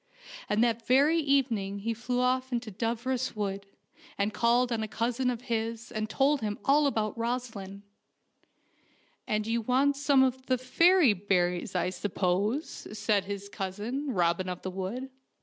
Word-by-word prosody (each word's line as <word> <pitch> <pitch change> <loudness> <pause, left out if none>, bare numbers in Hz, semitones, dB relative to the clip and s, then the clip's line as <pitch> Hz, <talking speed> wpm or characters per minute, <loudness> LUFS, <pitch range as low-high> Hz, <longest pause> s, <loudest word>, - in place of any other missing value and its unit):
And 210 +2 +3
that 230 -1 0
very 285 +6 +4
evening 245 -9 +1
he 230 +3 -1
flew 245 +2 -2
off 255 +1 +1
to 240 -3 -3
Dooros 235 +5 -2
Wood, 200 -1 -3 0.5
and 200 +1 0
called 240 +1 +2
on 230 -1 0
a 220 - -2
cousin 240 +4 -1
of 245 -2 -3
his 230 -1 -3
and 215 -2 -3
told 280 +4 +2
him 210 -1 -2
all 290 +1 +4
about 220 -5 -1
Rosaleen. 225 -5 -4 0.7
" - - -38
And 215 0 0
you 230 +1 0
want 265 +5 +2
some 280 -1 +4
of 260 0 -1
the 255 - +2
fairy 330 - +4
berries, 180 -2 0
I 180 0 +1
suppose," 205 - -1
said 205 -1 +1
his 200 0 -5
cousin, 210 +8 -4
Robin 180 -2 +1
of 180 -1 -6
the 185 - -3
Wood. 205 +9 -5
230 Hz, 160 wpm, -29 LUFS, 200-255 Hz, 0.7 s, very